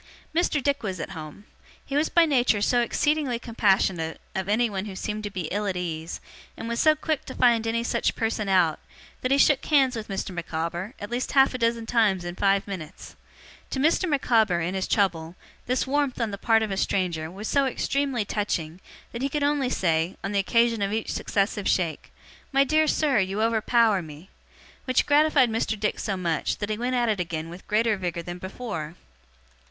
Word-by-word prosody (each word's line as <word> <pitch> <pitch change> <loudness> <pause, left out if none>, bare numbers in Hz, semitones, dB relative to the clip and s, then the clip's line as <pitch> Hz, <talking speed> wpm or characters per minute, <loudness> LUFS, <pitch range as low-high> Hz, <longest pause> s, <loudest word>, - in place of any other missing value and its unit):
Mr. 315 -4 +1
Dick 285 +1 +1
was 190 -5 -4
at - - -5
home. 160 +3 -9 0.4
He 275 - -5
was 300 +2 +2
by 340 -1 +5
nature 245 -8 +2
so 240 +4 +2
exceedingly 290 0 0
compassionate 190 -8 0
of 190 0 -3
anyone 210 -3 +1
who 200 -3 -7
seemed 210 +2 -4
to - - -2
be 185 -4 -4
ill 205 +2 -1
at 190 -2 -1
ease, 165 -2 -4 0.4
and 225 - -6
was 235 0 -2
so 310 -1 +5
quick 310 -1 -2
to 260 - -8
find 235 -2 +3
any 230 +1 0
such - - 0
person 220 -2 -1
out, 175 -5 +3 0.4
that 255 - -1
he 275 - +4
shook 275 -1 +4
hands 270 -4 +3
with 220 -2 -5
Mr. 195 0 -4
Micawber, 170 +5 -4
at 205 - -7
least 245 +1 -2
half 270 -1 +5
a 255 - -4
dozen 230 -1 0
times 215 -6 +2
in 175 - -4
five 195 +1 +2
minutes. 170 -6 -8 0.5
To - - -3
Mr. 330 +5 +2
Micawber, 225 - +2
in 175 +2 -2
his 190 -1 -2
trouble, 170 -5 0 0.3
this 255 0 +1
warmth, 280 -1 0
on 230 -3 -1
the 200 - -5
part 225 -1 +3
of 215 - -3
a 195 - -2
stranger, 170 -5 -1
was 200 +5 -7
so 280 -1 +2
extremely 270 -3 -1
touching, 180 -5 -3 0.3
that 235 - -6
he 275 - 0
could 295 0 -1
only 285 -3 +1
say, 165 -4 0
on 195 - -3
the 200 - +1
occasion 230 +2 +2
of 200 0 0
each 220 +1 -2
successive 200 0 -1
shake, 170 -4 -1 0.4
'My 275 0 +4
dear 310 +2 +2
sir, 290 -6 +2
you 190 +2 -1
overpower 225 -2 +3
me!' 155 +3 -12 0.5
Which 255 -1 +2
gratified 290 -4 +4
Mr. 220 -1 -1
Dick 210 0 -1
so 200 -3 -2
much, 170 -3 -1
that 205 0 -3
he 215 - -1
went 250 +1 -1
at 240 -1 +2
it 215 -3 0
again 165 -2 -3
with 175 +2 -11
greater 220 +1 +2
vigour 175 -2 -3
than 175 +1 -7
before. 185 -5 -6
215 Hz, 200 wpm, -25 LUFS, 185-250 Hz, 0.5 s, by